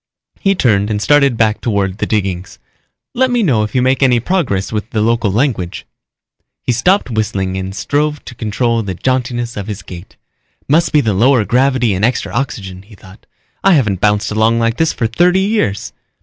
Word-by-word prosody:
He 195 0 +1
turned 105 - +2
and 105 -1 -1
started 140 0 +3
back 110 -1 +1
toward 100 -3 -1
the - - -1
diggings. 95 -4 -2 0.6
"Let 260 +1 +2
me 245 -2 +1
know 130 - +2
it 105 +2 -4
you 125 - +3
make 130 +1 +1
any 125 -3 +4
progress 120 - -1
with 110 0 -3
the 110 - -2
local 115 -1 +1
language." 105 -6 -1 0.8
He - - 0
stopped 130 - +1
whistling 100 -4 -2
and 95 +1 -5
strove 150 +5 -1
to - - -9
control 115 +1 -1
the 95 -4 -5
jauntiness 120 +1 -2
of 100 -1 -5
his 105 -1 -6
gait. 90 +1 -11 0.5
Must 160 +4 +2
be 150 - +4
the 110 -6 0
lower 115 +3 +3
gravity 125 -2 +2
and 95 +2 -2
extra 120 +3 0
oxygen, 100 -8 -4
he 105 +2 -17
thought. 95 +1 -17 0.4
_I 195 -2 +5
haven't 105 - 0
bounced 105 0 +1
along 110 +2 +2
like 115 0 0
this 160 -1 +2
for 115 - -2
thirty 175 +11 +2
years. 195 - -1
115 Hz, 190 wpm, -15 LUFS, 100-135 Hz, 0.8 s, I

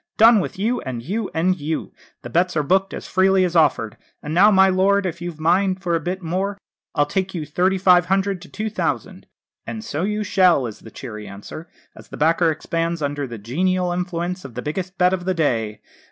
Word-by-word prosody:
'Done 225 0 +7
with 185 - -4
you, 225 +6 0
and 120 -3 -5
you, 205 - -3
and 180 +3 +1
you' 155 +2 -3 0.3
the - - -7
bets 175 0 +1
are 150 - +2
booked 190 +6 +2
as - - -7
freely 190 0 +3
as 175 -1 -3
offered. 115 -9 +2 0.3
'And 150 - -4
now, 195 +5 +6
my 190 -2 +6
lord, 190 +1 +2
if 170 -2 -4
you've 175 -2 -5
a - - -12
mind 185 +3 +2
for 175 -2 0
a 165 - +2
bit 180 +3 -4
more, 190 +4 -2 0.4
I'll 145 - +3
take 190 +5 -2
you 160 -3 -3
thirty 180 +6 +1
five 180 -2 +5
hundred 195 -1 0
to 185 - -12
two 215 0 -4
thousand.' - - -3 0.4
'And 220 -1 -5
so 155 -7 -3
you 210 +3 -1
shall!' 185 -8 +3
is 110 -3 -7
the 110 - -12
cheery 105 -3 -8
answer, 105 - -9 0.3
as - - -14
the - - -9
backer 165 +2 +3
expands 165 +1 -2
under 145 -1 -2
the 120 -2 -7
genial 180 - 0
influence 180 0 -3
of 130 -5 -10
the 125 - -5
biggest 180 +5 -4
bet 180 0 +3
of 175 -1 -3
the 185 0 0
day. 115 -9 -1
180 Hz, 220 wpm, -21 LUFS, 155-190 Hz, 0.4 s, Done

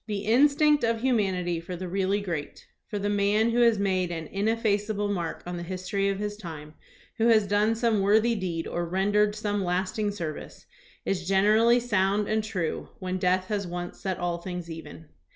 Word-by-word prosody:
The 205 -2 -3
instinct 290 +5 +4
of 230 -1 +1
humanity 190 -9 0
for 180 +2 -7
the 185 +1 -5
really 195 +2 0
great, 165 -7 -5 0.2
for 210 - -4
the 205 0 -2
man 205 +2 +2
who 240 - +1
has 235 -2 +5
made 190 -3 0
an 165 -2 -4
in 195 +6 -2
effaceable 210 -2 0
mark 170 -4 -4
on 175 0 -5
the - - -5
history 185 +3 -2
of 195 - -1
his 205 0 -4
time, 155 -6 -9 0.4
who 225 - +3
has 220 -3 +5
done 205 +3 +2
some 225 -3 +1
worthy 220 +4 +4
deed 180 -6 -3
or 175 - -2
rendered 205 +4 +1
some 205 -2 -1
lasting 185 +4 -1
serv 170 -7 -4
ice, - - -12 0.4
is 180 -2 -2
generally 215 +5 +4
sound 205 -3 +1
and 220 0 0
true 185 -7 -3
when 185 0 -3
death 185 +1 +2
has 205 -3 -2
once 175 0 -6
set 190 -2 -3
all 175 -1 -2
things 175 -1 -6
even. 160 0 -9
200 Hz, 190 wpm, -27 LUFS, 180-215 Hz, 0.4 s, has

